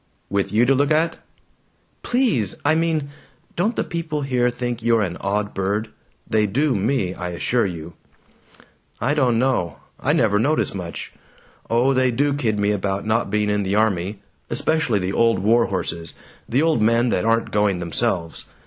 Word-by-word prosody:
"With 100 Hz, -1 st, 0 dB
you 110 Hz, +4 st, +4 dB
to 135 Hz, -, +4 dB
look 140 Hz, +1 st, +2 dB
at?" 160 Hz, +2 st, +1 dB, 0.8 s
"Please! 225 Hz, -, +1 dB
I 150 Hz, -, +4 dB
mean: 160 Hz, -3 st, 0 dB, 0.5 s
Don't 210 Hz, +7 st, 0 dB
the -, -, 0 dB
people 160 Hz, -3 st, -3 dB
here 125 Hz, -2 st, +1 dB
think 120 Hz, -1 st, -4 dB
you're 115 Hz, -1 st, +3 dB
an 90 Hz, -3 st, -3 dB
odd 105 Hz, +1 st, -1 dB
bird? 100 Hz, +3 st, -1 dB, 0.4 s
(They 110 Hz, -1 st, +2 dB
do 135 Hz, +7 st, +1 dB
me, 100 Hz, -3 st, 0 dB
I 90 Hz, -1 st, -5 dB
assure 110 Hz, +6 st, 0 dB
you!)" 85 Hz, -2 st, -7 dB, 1.1 s
"I 130 Hz, +6 st, +1 dB
don't 130 Hz, -6 st, +2 dB
know. 125 Hz, -9 st, 0 dB, 0.2 s
I -, -, +1 dB
never 105 Hz, -2 st, +3 dB
notice 145 Hz, +7 st, +1 dB
much. 90 Hz, -3 st, -6 dB, 0.6 s
Oh, 120 Hz, +4 st, +3 dB
they 130 Hz, -1 st, +3 dB
do 140 Hz, +4 st, +1 dB
kid 115 Hz, -7 st, 0 dB
me 100 Hz, 0 st, +1 dB
about 100 Hz, 0 st, -2 dB
not 110 Hz, +2 st, +1 dB
being 105 Hz, 0 st, +1 dB
in 105 Hz, 0 st, +1 dB
the 100 Hz, 0 st, -1 dB
army 100 Hz, -2 st, 0 dB, 0.3 s
especially 145 Hz, -1 st, +1 dB
the 95 Hz, 0 st, -2 dB
old 115 Hz, 0 st, +3 dB
warhorses, 95 Hz, -5 st, 0 dB, 0.3 s
the 135 Hz, +6 st, +2 dB
old 160 Hz, -8 st, +2 dB
men 115 Hz, +2 st, +3 dB
that 90 Hz, -, 0 dB
aren't 115 Hz, +1 st, +1 dB
going 105 Hz, -2 st, +2 dB
themselves. 85 Hz, -1 st, -2 dB
115 Hz, 165 wpm, -22 LUFS, 100-135 Hz, 1.1 s, you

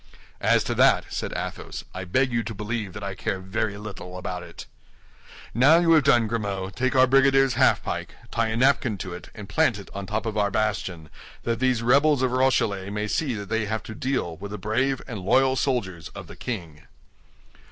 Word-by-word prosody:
"As -, -, +3 dB
to -, -, -2 dB
that," -, -, +4 dB
said -, -, -3 dB
Athos, -, -, -5 dB
"I 95 Hz, 0 st, -5 dB
beg 130 Hz, +8 st, +1 dB
you 115 Hz, -, +2 dB
to 115 Hz, 0 st, -5 dB
believe 105 Hz, -2 st, -4 dB
that 105 Hz, -, -7 dB
I 100 Hz, 0 st, -3 dB
care 95 Hz, +1 st, -3 dB
very 100 Hz, +2 st, -2 dB
little 95 Hz, -3 st, -8 dB
about 90 Hz, -1 st, -4 dB
it. 85 Hz, -1 st, -10 dB, 0.9 s
Now 140 Hz, +8 st, +6 dB
you 170 Hz, -1 st, +3 dB
have 155 Hz, -3 st, +6 dB
done, 120 Hz, -5 st, +5 dB
Grimaud, 100 Hz, -4 st, -3 dB
take 130 Hz, 0 st, 0 dB
our 130 Hz, 0 st, +7 dB
brigadier's 135 Hz, 0 st, +4 dB
half 130 Hz, +2 st, +3 dB
pike, -, -, -4 dB, 0.2 s
tie 115 Hz, -1 st, +1 dB
a 110 Hz, 0 st, -2 dB
napkin 130 Hz, -4 st, +2 dB
to 95 Hz, -2 st, -6 dB
it, 90 Hz, -, -9 dB
and 105 Hz, -2 st, -8 dB
plant 125 Hz, +1 st, +2 dB
it 100 Hz, -, -11 dB
on 100 Hz, -1 st, -6 dB
top 110 Hz, +3 st, -2 dB
of 110 Hz, -1 st, -3 dB
our 100 Hz, 0 st, +2 dB
bastion, 95 Hz, -6 st, -2 dB, 0.3 s
that 115 Hz, -1 st, -1 dB
these 130 Hz, -2 st, +1 dB
rebels 140 Hz, +3 st, +4 dB
of 130 Hz, -, +2 dB
Rochellais 115 Hz, -7 st, +1 dB
may 105 Hz, +1 st, -2 dB
see 130 Hz, +3 st, -1 dB
that 100 Hz, -2 st, -6 dB
they 110 Hz, -1 st, 0 dB
have 110 Hz, +1 st, -3 dB
to 110 Hz, -, -8 dB
deal 110 Hz, -10 st, -2 dB
with 100 Hz, +1 st, -7 dB
brave 125 Hz, +7 st, 0 dB
and 115 Hz, -4 st, -5 dB
loyal 130 Hz, +8 st, +3 dB
soldiers 95 Hz, -, -1 dB
of -, -, -7 dB
the -, -, -11 dB
king." 85 Hz, -11 st, -6 dB
110 Hz, 205 wpm, -25 LUFS, 100-130 Hz, 0.9 s, our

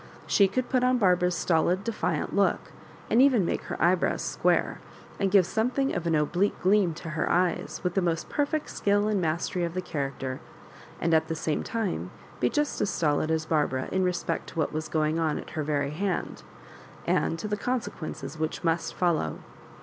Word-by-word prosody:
She 200 Hz, -, +4 dB
could 245 Hz, +6 st, -2 dB
put 255 Hz, -1 st, +1 dB
on 255 Hz, 0 st, +3 dB
Barbara's 180 Hz, -4 st, +3 dB
stolid 175 Hz, +3 st, +1 dB
defiant 225 Hz, 0 st, -2 dB
look, -, -, +1 dB, 0.4 s
and 235 Hz, -, +4 dB
even 255 Hz, -9 st, +5 dB
make -, -, -1 dB
her -, -, -5 dB
eyebrows 175 Hz, +1 st, +2 dB
square, -, -, +1 dB, 0.4 s
and 195 Hz, -1 st, +1 dB
g^ve 195 Hz, -3 st, +6 dB
some 220 Hz, +6 st, 0 dB
thing 270 Hz, +1 st, 0 dB
of 175 Hz, -1 st, -2 dB
an 165 Hz, -, +2 dB
oblique 175 Hz, +7 st, +1 dB
gleam 190 Hz, -3 st, +3 dB
to 165 Hz, -, -7 dB
her 155 Hz, -, -1 dB
eyes, 180 Hz, -1 st, 0 dB
with 180 Hz, -1 st, 0 dB
the 195 Hz, -, +2 dB
most 170 Hz, -2 st, -1 dB
perfect 300 Hz, +1 st, -1 dB
skill 205 Hz, +1 st, +1 dB
and 210 Hz, -3 st, +1 dB
mastery 170 Hz, +2 st, -1 dB
of 170 Hz, 0 st, -3 dB
the -, -, 0 dB
character, 135 Hz, -5 st, -4 dB, 0.6 s
and 165 Hz, 0 st, +1 dB
at 160 Hz, 0 st, +3 dB
the 160 Hz, -, -2 dB
same 155 Hz, -1 st, -1 dB
time 190 Hz, -, -2 dB, 0.3 s
be 125 Hz, -, +2 dB
just 295 Hz, 0 st, -1 dB
as 205 Hz, -, +1 dB
stolid 155 Hz, -1 st, +1 dB
as 160 Hz, 0 st, 0 dB
Barbara 145 Hz, -5 st, 0 dB
in 190 Hz, 0 st, +1 dB
respect 180 Hz, -1 st, -1 dB
to -, -, -12 dB
what 155 Hz, -, 0 dB
was 155 Hz, +1 st, -3 dB
going 155 Hz, 0 st, +1 dB
on 160 Hz, -2 st, +1 dB
at -, -, -8 dB
her 155 Hz, -, -3 dB
very 145 Hz, -1 st, -1 dB
hand, 185 Hz, +3 st, -2 dB, 0.6 s
and 165 Hz, -, +1 dB
to 190 Hz, -, -4 dB
the 210 Hz, -, -1 dB
consequences 175 Hz, -, -4 dB
which 155 Hz, 0 st, -2 dB
must 165 Hz, 0 st, 0 dB
follow. 165 Hz, -, 0 dB
175 Hz, 195 wpm, -27 LUFS, 155-205 Hz, 0.6 s, g^ve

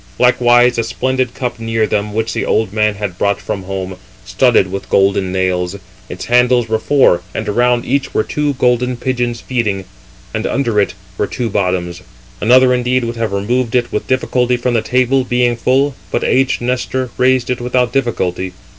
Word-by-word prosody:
Likewise 120 Hz, -1 st, +4 dB
a -, -, +1 dB
splendid 130 Hz, +1 st, -2 dB
cup 125 Hz, -2 st, -3 dB
382 115 Hz, -, -9 dB
near 115 Hz, -1 st, +1 dB
them, 105 Hz, 0 st, -1 dB
which 110 Hz, +2 st, -2 dB
the -, -, -2 dB
old 110 Hz, -3 st, 0 dB
man 105 Hz, -1 st, +1 dB
had 100 Hz, -3 st, -5 dB
brought 100 Hz, -1 st, +1 dB
from 100 Hz, -, -4 dB
home, 95 Hz, -1 st, -5 dB, 0.3 s
studded 115 Hz, -4 st, +2 dB
with 100 Hz, -, -5 dB
golden 95 Hz, -1 st, +2 dB
nails. 95 Hz, 0 st, -1 dB, 0.3 s
Its 90 Hz, -, -6 dB
handles 125 Hz, 0 st, +3 dB
were 110 Hz, 0 st, 0 dB
four, 130 Hz, -10 st, +3 dB
and -, -, -3 dB
around 120 Hz, +3 st, +1 dB
each 140 Hz, +2 st, -1 dB
were -, -, +1 dB
two 150 Hz, -1 st, -1 dB
golden 125 Hz, 0 st, +1 dB
pigeons 120 Hz, -2 st, -2 dB
feeding, 105 Hz, -7 st, -2 dB, 0.5 s
and 110 Hz, 0 st, -2 dB
under 120 Hz, -6 st, 0 dB
it 100 Hz, -, -2 dB, 0.2 s
were -, -, +1 dB
two 120 Hz, -4 st, -3 dB
bottoms. 90 Hz, -3 st, -1 dB, 0.4 s
Another 125 Hz, +3 st, +5 dB
indeed 125 Hz, 0 st, +1 dB
would 115 Hz, 0 st, -3 dB
have 115 Hz, -3 st, -2 dB
removed 115 Hz, +5 st, -1 dB
it 120 Hz, -1 st, +1 dB
with 105 Hz, -, -3 dB
difficulty 125 Hz, -1 st, +1 dB
from 120 Hz, 0 st, -1 dB
the 115 Hz, -, +2 dB
table, 130 Hz, +3 st, +1 dB
being 125 Hz, -1 st, +1 dB
full; 135 Hz, +4 st, +1 dB, 0.2 s
but -, -, -1 dB
aged 135 Hz, -1 st, +1 dB
Nestor 125 Hz, +1 st, -2 dB
raised 130 Hz, -1 st, +2 dB
it 125 Hz, -, -2 dB
without 125 Hz, 0 st, 0 dB
difficulty. 95 Hz, -8 st, -1 dB
120 Hz, 180 wpm, -16 LUFS, 105-125 Hz, 0.5 s, Another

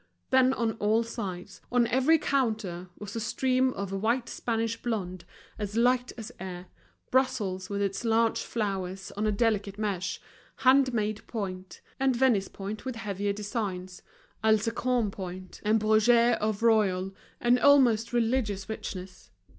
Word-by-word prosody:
Then 260 Hz, 0 st, +5 dB
on 230 Hz, -3 st, 0 dB
all 215 Hz, +2 st, +2 dB
sides, 200 Hz, -5 st, -6 dB
on 245 Hz, -1 st, +4 dB
every 265 Hz, +7 st, +4 dB
counter, 215 Hz, -, -1 dB
was 210 Hz, +2 st, -8 dB
a -, -, -1 dB
stream 255 Hz, +3 st, +1 dB
of 200 Hz, -1 st, -5 dB
white 230 Hz, +5 st, 0 dB
Spanish 230 Hz, -1 st, -2 dB
blonde 185 Hz, -7 st, -3 dB, 0.3 s
as 210 Hz, +1 st, -3 dB
light 245 Hz, +1 st, +3 dB
as 225 Hz, +1 st, -7 dB
air, 180 Hz, -1 st, -6 dB, 0.5 s
Brussels 210 Hz, -8 st, 0 dB
with 200 Hz, 0 st, -1 dB
its 195 Hz, +1 st, -2 dB
large 230 Hz, 0 st, +2 dB
flowers 195 Hz, -3 st, -3 dB
on 210 Hz, +2 st, -2 dB
a -, -, +2 dB
delicate 205 Hz, -2 st, 0 dB
mesh, 200 Hz, -4 st, -2 dB, 0.4 s
hand 260 Hz, 0 st, +4 dB
made 215 Hz, -2 st, -1 dB
point, 185 Hz, -4 st, -5 dB, 0.2 s
and 265 Hz, -1 st, +2 dB
Venice 235 Hz, -6 st, +3 dB
point 205 Hz, +2 st, -6 dB
with 260 Hz, -1 st, -4 dB
heavier 205 Hz, -2 st, -2 dB
designs, 200 Hz, -4 st, -4 dB, 0.4 s
Alençon 225 Hz, +1 st, +2 dB
point, 185 Hz, -1 st, -8 dB
and 220 Hz, +1 st, +3 dB
Bruges 230 Hz, +3 st, +4 dB
of 215 Hz, 0 st, -1 dB
royal 195 Hz, -4 st, +2 dB, 0.3 s
and 240 Hz, +1 st, +3 dB
almost 245 Hz, -5 st, +5 dB
religious 225 Hz, -5 st, 0 dB
richness. 185 Hz, -4 st, -7 dB
215 Hz, 140 wpm, -28 LUFS, 195-240 Hz, 0.5 s, Then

